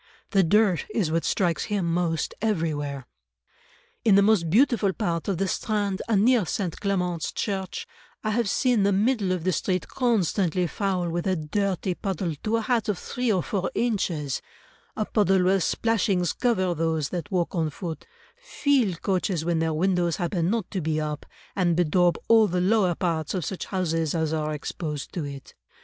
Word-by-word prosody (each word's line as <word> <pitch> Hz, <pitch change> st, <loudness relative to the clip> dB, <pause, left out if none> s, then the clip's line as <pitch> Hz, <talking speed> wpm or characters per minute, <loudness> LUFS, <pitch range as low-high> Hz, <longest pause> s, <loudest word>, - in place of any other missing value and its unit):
The 195 Hz, -, +4 dB
dirt 195 Hz, 0 st, +3 dB
is 185 Hz, -9 st, +1 dB
what 165 Hz, +1 st, +1 dB
strikes 175 Hz, -4 st, 0 dB
him 205 Hz, -4 st, -1 dB
most 165 Hz, -1 st, 0 dB
everywhere: 150 Hz, -, -1 dB, 1.0 s
"In 210 Hz, -4 st, +5 dB
the 200 Hz, -, +6 dB
most 200 Hz, -6 st, +3 dB
beautiful 220 Hz, -, +3 dB
part 170 Hz, -7 st, -2 dB
of 195 Hz, -4 st, 0 dB
the 195 Hz, +2 st, 0 dB
Strand 205 Hz, -2 st, -1 dB
and 210 Hz, -2 st, +3 dB
near 245 Hz, -3 st, +4 dB
St. 175 Hz, 0 st, -3 dB
Clement's 180 Hz, -5 st, -1 dB
Church, 190 Hz, -3 st, -3 dB, 0.4 s
I 215 Hz, -, 0 dB
have 230 Hz, -1 st, +1 dB
seen 245 Hz, -2 st, +2 dB
the 200 Hz, +1 st, +3 dB
middle 205 Hz, 0 st, +1 dB
of 180 Hz, -3 st, -1 dB
the 185 Hz, -, +1 dB
street 185 Hz, +1 st, -1 dB
constantly 190 Hz, -, +1 dB
foul 185 Hz, 0 st, -1 dB
with 175 Hz, +2 st, -2 dB
a 190 Hz, -, +2 dB
dirty 185 Hz, +3 st, -1 dB
puddle 185 Hz, -2 st, -3 dB
to 220 Hz, +1 st, 0 dB
a -, -, -1 dB
height 230 Hz, -2 st, 0 dB
of 205 Hz, -, 0 dB
three 245 Hz, +5 st, -2 dB
or 185 Hz, -4 st, +1 dB
four 195 Hz, -3 st, -2 dB
inches; 170 Hz, -, -1 dB, 0.6 s
a 215 Hz, -, 0 dB
puddle 195 Hz, -4 st, +2 dB
where 190 Hz, +2 st, +3 dB
splashings 195 Hz, -3 st, +1 dB
cover 185 Hz, -8 st, +1 dB
those 160 Hz, -3 st, -1 dB
that 175 Hz, -4 st, -4 dB
walk 180 Hz, -3 st, -1 dB
on 165 Hz, -4 st, 0 dB
foot, 165 Hz, +1 st, -7 dB, 0.3 s
fill 285 Hz, -, +1 dB
coaches 185 Hz, -3 st, 0 dB
when 170 Hz, -1 st, +1 dB
their 160 Hz, 0 st, +1 dB
windows 175 Hz, +1 st, +1 dB
happen 175 Hz, -1 st, -1 dB
not 225 Hz, -2 st, 0 dB
to 190 Hz, -, -2 dB
be 155 Hz, 0 st, 0 dB
up, 150 Hz, -1 st, -4 dB, 0.3 s
and 175 Hz, -3 st, +2 dB
bedaub 175 Hz, +1 st, +3 dB
all 225 Hz, -2 st, +6 dB
the 180 Hz, -1 st, -1 dB
lower 185 Hz, -1 st, +2 dB
parts 165 Hz, -2 st, -1 dB
of 180 Hz, -5 st, -2 dB
such 190 Hz, -, -4 dB
houses 165 Hz, -4 st, -1 dB
as 160 Hz, -1 st, 0 dB
are 155 Hz, -1 st, -1 dB
exposed 150 Hz, 0 st, -5 dB
to 165 Hz, -5 st, -3 dB
it. 140 Hz, -1 st, -9 dB
185 Hz, 180 wpm, -25 LUFS, 165-205 Hz, 1.0 s, the